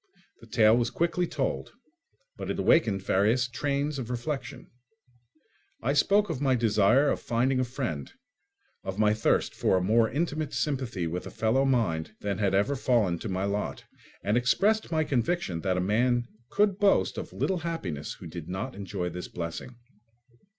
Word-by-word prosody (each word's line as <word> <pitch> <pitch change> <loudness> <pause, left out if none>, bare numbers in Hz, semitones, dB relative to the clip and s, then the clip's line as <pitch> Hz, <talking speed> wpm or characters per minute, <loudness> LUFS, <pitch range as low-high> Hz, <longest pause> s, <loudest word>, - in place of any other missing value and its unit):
The - - -15
tale 110 0 +5
was 120 0 +1
quickly 170 +6 0
told, 140 -4 -3 0.6
but - - -6
it - - -2
awakened 105 - +3
various 110 +6 +2
trains 140 +3 -2
of 120 -3 -5
reflection. 125 +1 -5 1.1
I 135 +4 +1
spoke 200 +8 +3
of 155 -6 -4
my 135 -2 +3
desire 115 +4 +3
of - - -2
finding 130 +3 +1
a - - +2
friend, 120 - -4 0.7
of 95 0 -5
my 105 0 +4
thirst 110 +1 +1
for 95 - +2
a 90 - 0
more 110 +3 +3
intimate 155 +1 -2
sympathy 130 - -1
with 85 +2 -4
a - - -6
fellow 120 +5 +1
mind 110 -9 0
than 100 -2 -2
had 100 -2 +2
ever 105 +9 +2
fallen 115 -10 +1
to 110 - -5
my 95 0 -1
lot, 100 +1 -2 0.4
and 105 +3 +2
expressed 200 - +2
my 160 -1 +2
conviction 130 - -1
that 95 +1 0
a - - +1
man 120 +6 +2 0.2
could 205 -1 +2
boast 205 -1 +3
of - - -7
little 190 -2 -1
happiness 130 - -4
who - - -12
did 85 -1 -8
not 95 +8 -4
enjoy 95 -2 -4
this 90 +1 -5
blessing. 85 +8 -6
120 Hz, 170 wpm, -28 LUFS, 100-140 Hz, 1.1 s, tale